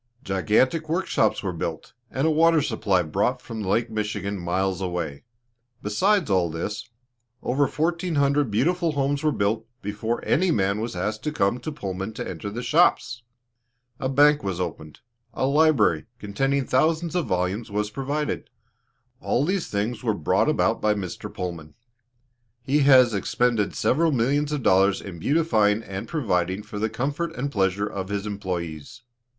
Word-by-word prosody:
Gigantic 120 Hz, -, +1 dB
work 180 Hz, +4 st, 0 dB
shops 110 Hz, -, +1 dB
were 95 Hz, -2 st, -2 dB
built, 80 Hz, -1 st, -5 dB, 0.2 s
and 135 Hz, +3 st, -1 dB
a 160 Hz, -, +3 dB
water 165 Hz, +1 st, +4 dB
supply 100 Hz, -8 st, +1 dB
brought 75 Hz, -, 0 dB
from 110 Hz, -1 st, -7 dB
Lake 110 Hz, +4 st, 0 dB
Michigan, 105 Hz, -2 st, -2 dB
miles 95 Hz, +2 st, -1 dB
away. 90 Hz, -3 st, -4 dB, 0.6 s
Besides 185 Hz, -, +2 dB
all 90 Hz, -3 st, +2 dB
this, 85 Hz, +6 st, -5 dB, 0.5 s
over 135 Hz, +3 st, +2 dB
fourteen 170 Hz, +3 st, -1 dB
hundred 140 Hz, -1 st, +2 dB
beautiful 165 Hz, -, +1 dB
homes 140 Hz, 0 st, 0 dB
were 155 Hz, -1 st, +2 dB
built 110 Hz, -1 st, -1 dB, 0.2 s
before 105 Hz, +3 st, -3 dB
any 185 Hz, +4 st, +2 dB
man 100 Hz, -, +1 dB
was 115 Hz, -3 st, -4 dB
asked 105 Hz, +5 st, -2 dB
to 150 Hz, -, 0 dB
come 110 Hz, -4 st, +1 dB
to 155 Hz, -, -5 dB
Pullman 95 Hz, -6 st, -5 dB
to 120 Hz, +2 st, -5 dB
enter 105 Hz, -, -5 dB
the 120 Hz, +4 st, -5 dB
shops. 120 Hz, 0 st, +2 dB, 0.8 s
A 130 Hz, -, -1 dB
bank 145 Hz, +2 st, +5 dB
was 95 Hz, -3 st, -3 dB
opened, 80 Hz, -3 st, -6 dB, 0.3 s
a -, -, 0 dB
library, 140 Hz, -, +3 dB
containing 135 Hz, +7 st, -1 dB
thousands 160 Hz, +6 st, +1 dB
of 180 Hz, -2 st, 0 dB
volumes, 90 Hz, +5 st, -1 dB
was 105 Hz, +1 st, -2 dB
provided; 140 Hz, +5 st, -3 dB, 0.7 s
all 135 Hz, -, 0 dB
these 185 Hz, +1 st, -1 dB
things 105 Hz, +4 st, -2 dB
were 110 Hz, -4 st, +1 dB
brought 80 Hz, -, +1 dB
about -, -, +1 dB
by 105 Hz, 0 st, +2 dB
Mr. 95 Hz, -4 st, -6 dB
Pullman. 85 Hz, -4 st, -6 dB, 0.9 s
He 140 Hz, +3 st, +2 dB
has 130 Hz, -4 st, +6 dB
expended 110 Hz, +2 st, 0 dB
several 165 Hz, +1 st, +2 dB
million 140 Hz, +3 st, +1 dB
of 145 Hz, -4 st, -2 dB
dollars 95 Hz, +1 st, +4 dB
in 90 Hz, -4 st, -9 dB
beautifying 110 Hz, -, +2 dB
and 95 Hz, -1 st, -6 dB
providing 95 Hz, -, -1 dB
for 105 Hz, -, -7 dB
the 110 Hz, +1 st, 0 dB
comfort 145 Hz, +9 st, -3 dB
and 140 Hz, +3 st, -3 dB
pleasure 100 Hz, -2 st, +1 dB
of 95 Hz, -2 st, -5 dB
his 100 Hz, 0 st, -2 dB
employes. 90 Hz, -, -5 dB
110 Hz, 160 wpm, -24 LUFS, 95-145 Hz, 0.9 s, has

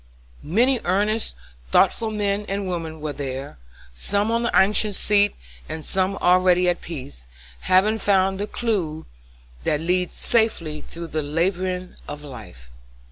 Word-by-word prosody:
Many 240 Hz, -, +2 dB
earnest, 210 Hz, -, +1 dB, 0.3 s
thoughtful 220 Hz, -, +3 dB
men 205 Hz, -1 st, -1 dB
and 195 Hz, 0 st, -2 dB
women 165 Hz, -3 st, -4 dB
were 150 Hz, -1 st, -3 dB
there, 135 Hz, -, -6 dB, 0.3 s
some 205 Hz, -, 0 dB
on 230 Hz, 0 st, +1 dB
the 235 Hz, -, -1 dB
anxious 205 Hz, +1 st, +4 dB
seat, 205 Hz, -1 st, +3 dB, 0.3 s
and 160 Hz, -1 st, -5 dB
some 190 Hz, +1 st, 0 dB
already 180 Hz, 0 st, +4 dB
at 175 Hz, 0 st, +1 dB
peace, 70 Hz, -, -8 dB, 0.3 s
having 205 Hz, -, +3 dB
found 195 Hz, -1 st, +2 dB
the 205 Hz, -, -2 dB
clew 185 Hz, -12 st, -2 dB, 0.6 s
that 150 Hz, -, +1 dB
leads 180 Hz, +2 st, 0 dB
safely 170 Hz, -10 st, +1 dB
through 170 Hz, 0 st, -7 dB
the 155 Hz, -, -1 dB
labyrinth 180 Hz, +4 st, -2 dB
of 145 Hz, 0 st, -7 dB
life. 60 Hz, -, -11 dB
185 Hz, 135 wpm, -23 LUFS, 155-205 Hz, 0.6 s, anxious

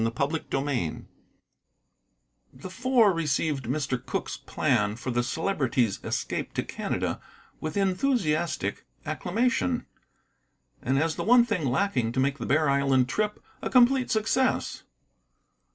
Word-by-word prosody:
CHAPTER 150 Hz, +4 st, 0 dB
XII 135 Hz, -, -1 dB, 1.5 s
The 160 Hz, +8 st, -9 dB
Four 235 Hz, -1 st, +3 dB
received 150 Hz, -4 st, -1 dB
Mr. 130 Hz, 0 st, -2 dB
Cooke's -, -, -3 dB
plan 105 Hz, 0 st, 0 dB
for 125 Hz, +2 st, -4 dB
the 120 Hz, 0 st, +1 dB
Celebrity's 130 Hz, -, 0 dB
escape -, -, -3 dB
to -, -, 0 dB
Canada -, -, -3 dB, 0.4 s
with 155 Hz, +4 st, -4 dB
enthusiastic 180 Hz, -, 0 dB, 0.2 s
acclamation, 235 Hz, -, 0 dB, 1.0 s
and 130 Hz, +2 st, 0 dB
as 160 Hz, +2 st, 0 dB
the -, -, -2 dB
one 240 Hz, +2 st, +6 dB
thing 180 Hz, -, -1 dB
lacking 125 Hz, -, 0 dB
to 130 Hz, -, -1 dB
make 135 Hz, +1 st, +1 dB
the 120 Hz, -, -4 dB
Bear 155 Hz, +2 st, +3 dB
Island 135 Hz, -2 st, +2 dB
trip 210 Hz, +8 st, -1 dB, 0.2 s
a -, -, -2 dB
complete 255 Hz, +1 st, +4 dB
success. 225 Hz, +4 st, 0 dB
155 Hz, 120 wpm, -27 LUFS, 130-210 Hz, 1.5 s, one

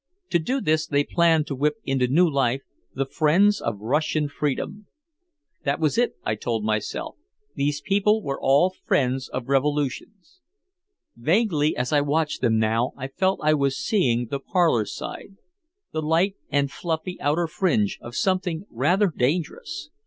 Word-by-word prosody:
To 170 Hz, -, +3 dB
do 255 Hz, +12 st, -1 dB
this 155 Hz, -2 st, +1 dB
they 145 Hz, -1 st, +2 dB
planned 165 Hz, -1 st, +3 dB
to 145 Hz, -, -4 dB
whip 150 Hz, +6 st, +1 dB
into 135 Hz, -2 st, +1 dB
new 170 Hz, +8 st, +4 dB
life 135 Hz, -3 st, 0 dB, 0.3 s
"The 135 Hz, +1 st, 0 dB
Friends 175 Hz, +9 st, +3 dB
of 115 Hz, -3 st, -2 dB
Russian 150 Hz, +6 st, 0 dB
Freedom." 150 Hz, +8 st, -3 dB, 0.8 s
That 140 Hz, +1 st, 0 dB
was 155 Hz, +1 st, +1 dB
it, 240 Hz, +1 st, +1 dB
I 110 Hz, -, +1 dB
told 110 Hz, 0 st, -2 dB
myself, 110 Hz, -, -2 dB, 0.4 s
these 145 Hz, +1 st, -1 dB
people 210 Hz, +2 st, +2 dB
were 135 Hz, -1 st, -4 dB
all 145 Hz, +8 st, +4 dB
friends 130 Hz, 0 st, 0 dB
of 125 Hz, -1 st, -5 dB
revolutions. 145 Hz, -, -2 dB, 0.8 s
Vaguely 155 Hz, -, +1 dB
as 125 Hz, +3 st, -1 dB
I 145 Hz, -, +4 dB
watched 150 Hz, +2 st, 0 dB
them 110 Hz, -1 st, +2 dB
now 110 Hz, +3 st, +1 dB
I 135 Hz, 0 st, -5 dB
felt 190 Hz, +7 st, 0 dB
I 155 Hz, 0 st, +4 dB
was 140 Hz, -2 st, +1 dB
seeing 120 Hz, -, +1 dB
the 140 Hz, -, -1 dB
parlor 165 Hz, -, +2 dB
side, 195 Hz, -, -7 dB, 0.5 s
the 155 Hz, -, -2 dB
light 165 Hz, +6 st, +1 dB
and 140 Hz, -1 st, +1 dB
fluffy 165 Hz, +3 st, -4 dB
outer 155 Hz, +4 st, +1 dB
fringe, 155 Hz, -, 0 dB
of 120 Hz, 0 st, -9 dB
something 185 Hz, -2 st, 0 dB
rather 175 Hz, -, +2 dB
dangerous. 170 Hz, -, -2 dB
150 Hz, 155 wpm, -24 LUFS, 135-175 Hz, 0.8 s, new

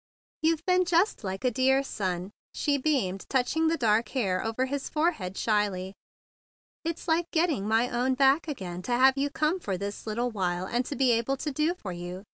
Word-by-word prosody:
"You've 325 Hz, 0 st, +1 dB
been 365 Hz, -1 st, +4 dB
just 350 Hz, -, +1 dB
like 190 Hz, -1 st, -4 dB
a 250 Hz, -, +3 dB
dear 265 Hz, +3 st, +3 dB
son," 185 Hz, -6 st, -3 dB, 0.2 s
she 285 Hz, -1 st, +1 dB
beamed, 250 Hz, -11 st, -1 dB
touching 275 Hz, +5 st, +1 dB
the 330 Hz, +1 st, +1 dB
dark 225 Hz, -3 st, +2 dB
hair 195 Hz, -9 st, 0 dB
over 225 Hz, +3 st, -1 dB
his 275 Hz, +1 st, -3 dB
forehead 300 Hz, -, -1 dB
shyly. 200 Hz, -4 st, 0 dB, 0.9 s
"It's 330 Hz, +1 st, -4 dB
like 335 Hz, +1 st, +1 dB
get¬ 330 Hz, 0 st, +3 dB
ting 265 Hz, -, -2 dB
my 225 Hz, +3 st, +3 dB
own 250 Hz, +2 st, 0 dB
back 275 Hz, +4 st, +3 dB
again 185 Hz, -, -5 dB
to 240 Hz, +7 st, -2 dB
have 260 Hz, +2 st, +5 dB
you 280 Hz, +1 st, 0 dB
come 310 Hz, +5 st, 0 dB
for 195 Hz, -, -3 dB
this 200 Hz, +3 st, -6 dB
little 240 Hz, +3 st, -1 dB
while, 180 Hz, -3 st, -1 dB
and 240 Hz, +6 st, 0 dB
to 285 Hz, -, -4 dB
be 265 Hz, -3 st, +3 dB
able 235 Hz, +4 st, +1 dB
to 295 Hz, -, -3 dB
do 305 Hz, +5 st, 0 dB
for 200 Hz, -, -7 dB
you. 175 Hz, +2 st, -7 dB
250 Hz, 200 wpm, -28 LUFS, 200-300 Hz, 0.9 s, have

